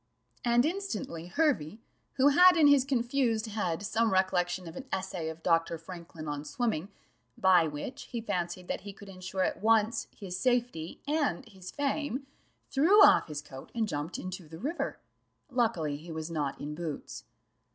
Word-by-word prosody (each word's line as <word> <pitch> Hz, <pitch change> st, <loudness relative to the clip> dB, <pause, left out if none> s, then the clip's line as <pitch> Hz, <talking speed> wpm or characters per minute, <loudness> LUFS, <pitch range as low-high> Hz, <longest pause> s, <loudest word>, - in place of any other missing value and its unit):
'" -, -, -45 dB
and 240 Hz, +1 st, +4 dB
instantly 310 Hz, -, -3 dB
Hervey, 210 Hz, -, +1 dB, 0.4 s
who 275 Hz, +2 st, +5 dB
had 360 Hz, +5 st, +7 dB
in 315 Hz, -, +6 dB
his 285 Hz, -2 st, +6 dB
confused 240 Hz, -3 st, +1 dB
head 200 Hz, -5 st, -2 dB
some 225 Hz, +2 st, +1 dB
recollection 185 Hz, -1 st, +1 dB
of 165 Hz, -, -9 dB
an 265 Hz, -, -7 dB
essay 185 Hz, -4 st, -3 dB
of 160 Hz, 0 st, -9 dB
Dr. 165 Hz, -1 st, +2 dB
Franklin 165 Hz, -1 st, -9 dB
on 145 Hz, 0 st, -3 dB
swimming, 190 Hz, +2 st, -2 dB, 0.5 s
by 180 Hz, -3 st, +5 dB
which 155 Hz, -, -6 dB
he 240 Hz, -, -5 dB
fancied 180 Hz, -4 st, -3 dB
that -, -, -3 dB
he 200 Hz, +1 st, -8 dB
could 200 Hz, +1 st, -13 dB
ensure 185 Hz, 0 st, -3 dB
at -, -, -1 dB
once 225 Hz, +1 st, +3 dB
his 185 Hz, -2 st, -5 dB
safety 240 Hz, -9 st, 0 dB
and 290 Hz, -4 st, 0 dB
his 190 Hz, -4 st, -10 dB
fame, 285 Hz, -1 st, -2 dB, 0.5 s
threw 370 Hz, +10 st, +6 dB
off -, -, +5 dB
his 150 Hz, -2 st, -5 dB
coat 135 Hz, -2 st, -11 dB
and 225 Hz, -2 st, +1 dB
jumped 150 Hz, -1 st, -3 dB
into 185 Hz, -2 st, -6 dB
the 160 Hz, -, -9 dB
river 295 Hz, -, -3 dB, 0.5 s
luckily 200 Hz, -, 0 dB
he 165 Hz, +3 st, -10 dB
was 160 Hz, +1 st, -5 dB
not 145 Hz, -4 st, -2 dB
in 150 Hz, +1 st, -5 dB
boots. 155 Hz, -2 st, -6 dB
190 Hz, 170 wpm, -30 LUFS, 165-245 Hz, 0.5 s, had